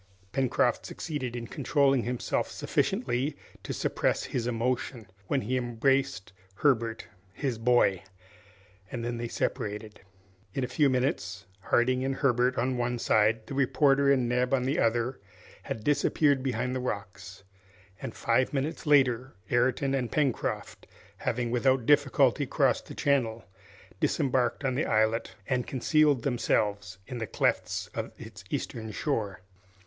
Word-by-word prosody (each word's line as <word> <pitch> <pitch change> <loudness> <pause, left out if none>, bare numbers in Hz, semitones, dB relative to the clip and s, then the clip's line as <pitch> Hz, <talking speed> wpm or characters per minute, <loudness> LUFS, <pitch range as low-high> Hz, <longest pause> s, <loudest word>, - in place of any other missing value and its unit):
Pencroft 125 -2 +1
succeeded 130 -7 -5
in 120 -1 -4
controlling 135 +1 +2
himself 125 0 -1
sufficiently 130 +4 -1 0.2
to - - -6
suppress - - 0
his 120 -1 -2
emotion 120 0 -2 0.2
when 135 - +1
he 125 +4 -2
embraced 125 -3 0 0.2
Herbert, 115 -4 +1 0.3
his 130 -3 -2
boy! 115 -6 +3 0.9
and 120 -2 -4
then 120 0 -2
they 120 - -3
separated. 105 -1 -3 0.5
In 135 - 0
a - - -1
few 140 +2 +2
moments 110 -7 -1
Harding 125 +6 +2
and 135 0 -1
Herbert 125 -2 +2
on 125 +2 0
one 120 0 0
side, 110 0 +2
the - - -7
reporter 140 +1 +3
and 130 -3 +2
Neb 125 +2 +2
on 125 - -1
the 135 +3 0
other, 120 +3 +1 0.4
had 110 - -5
disappeared 145 0 +2
behind 125 -1 -1
the - - -1
rocks, 100 -4 -6 0.6
and 115 - -6
five 125 +4 +1
minutes 145 +4 -2
later 130 -3 +3 0.2
Ayrton 130 +3 +2
and 130 -3 -1
Pencroft, 140 -5 -1 0.3
having 120 0 -2
without 130 0 +2
difficulty 140 -1 +3
crossed 135 -1 +1
the - - -9
channel, 115 -7 0 0.5
disembarked 130 0 +1
on 130 - +1
the 135 - 0
islet 110 +1 +1
and 125 -1 0
concealed 145 0 +2
themselves 105 -7 0
in 125 +2 -6
the 110 - -3
clefts - - 0
of - - -4
its - - -11
eastern 110 -1 -4
shore. 105 -6 -2
125 Hz, 140 wpm, -28 LUFS, 115-135 Hz, 0.9 s, boy